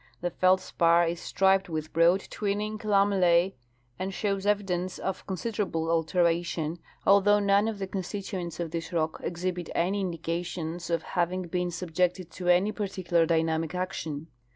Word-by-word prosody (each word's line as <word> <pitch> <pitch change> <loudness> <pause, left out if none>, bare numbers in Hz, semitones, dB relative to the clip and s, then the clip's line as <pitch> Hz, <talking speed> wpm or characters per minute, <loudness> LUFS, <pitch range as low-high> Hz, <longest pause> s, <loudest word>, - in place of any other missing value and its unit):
The 175 0 -1
feldspar 175 -2 +3
is 170 0 -2
striped 195 0 +2
with 155 -1 -4
broad 170 +4 +4
twin 205 -1 -1
ning 215 +1 -3
lamella?, 195 -3 +3 0.5
and 190 +1 -2
shows 200 0 -2
evidence 185 -3 0
of 190 -1 -4
considerable 190 -5 -2
alteration, 170 -1 +1 0.3
although 200 +1 +6
none 200 +1 +3
of 220 -2 -2
the 195 - -3
constituents 190 -2 -5
of 170 -2 -3
this 165 -1 -4
rock 160 -2 -1
exhibit 175 0 -3
any 190 +4 +1
indi 180 -3 -2
cations 170 0 -4
of 170 -1 0
having 180 +1 -1
been 180 +1 -2
subjected 180 0 -1
to 180 -1 -6
any 180 +4 +4
particular 185 -5 0
dynamic 160 0 0
action. 160 -5 -3
180 Hz, 150 wpm, -28 LUFS, 170-195 Hz, 0.5 s, although